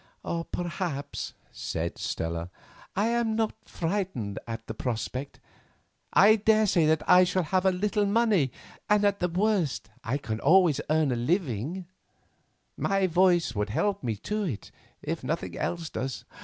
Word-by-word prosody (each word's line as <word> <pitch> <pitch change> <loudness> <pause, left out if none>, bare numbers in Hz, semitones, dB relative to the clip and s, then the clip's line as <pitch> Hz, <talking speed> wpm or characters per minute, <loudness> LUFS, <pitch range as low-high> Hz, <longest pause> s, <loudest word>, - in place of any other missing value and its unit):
"Perhaps," 170 -5 -4 0.2
said 85 +1 -4
Stella, 85 +1 -3 0.5
"I 210 +4 +2
am 235 -2 +1
not 220 -1 0
frightened 165 - -2
at 115 0 -5
the 110 - -5
prospect. 125 +4 -4 0.7
I 215 +3 +7
daresay 210 -6 +3
that 155 -1 +1
I 180 0 +8
shall 180 0 +1
have 185 +4 +1
a - - +5
little 205 +2 0
money 205 - +3 0.4
and 210 0 +4
at 200 0 +2
the 180 - +1
worst 185 - 0
I 130 +4 -1
can 110 -6 -4
always 160 -1 +4
earn 155 -3 +3
a - - +1
living; 155 - -1 0.9
my 195 -1 +1
voice 175 -5 +3
would 105 -1 -1
help 200 - 0
me 115 -3 -1
to 210 - -3
it, 155 - -4 0.3
if 160 0 -3
nothing 155 +6 -3
else 170 -2 -3
does. 130 0 -4
175 Hz, 145 wpm, -28 LUFS, 130-200 Hz, 0.9 s, I